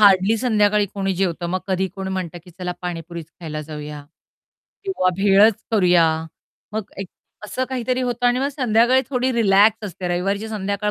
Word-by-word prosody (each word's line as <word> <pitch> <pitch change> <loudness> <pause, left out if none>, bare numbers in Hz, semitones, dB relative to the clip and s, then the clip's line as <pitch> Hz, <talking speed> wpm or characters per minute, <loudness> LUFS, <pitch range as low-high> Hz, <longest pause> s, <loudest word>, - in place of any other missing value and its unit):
Hardly 200 +1 +5
संध्याकाळी 210 -3 +2
कोणी 195 -1 -1
जेवतं. 175 -2 -1
मग 185 +2 -2
कधी 190 0 0
कोण 190 -1 -5
म्हणतं 180 -2 -4
की 180 - -14
चला 180 +1 -5
पाणीपुरीच 170 -2 -5
खायला 155 -2 -5
जाऊया. 150 -1 -8 0.8
किंवा 380 - +1
भेळचं 200 +2 +5 0.2
करूया. 180 -4 +5 0.7
मग 215 -2 -4
एक 195 - -6 0.4
असं 255 +5 -2
काहीतरी 255 -1 -1
होतं 245 -1 0
आणि 245 +1 +3
मग 275 - +1
संध्याकाळी 255 -2 +3
थोडी 255 0 +1
रिलॅक्स 215 -1 +4
असते 180 0 -5
रविवारीची 195 +5 -1
संध्याकाळ 205 -1 -2
195 Hz, 160 wpm, -21 LUFS, 180-225 Hz, 0.8 s, Hardly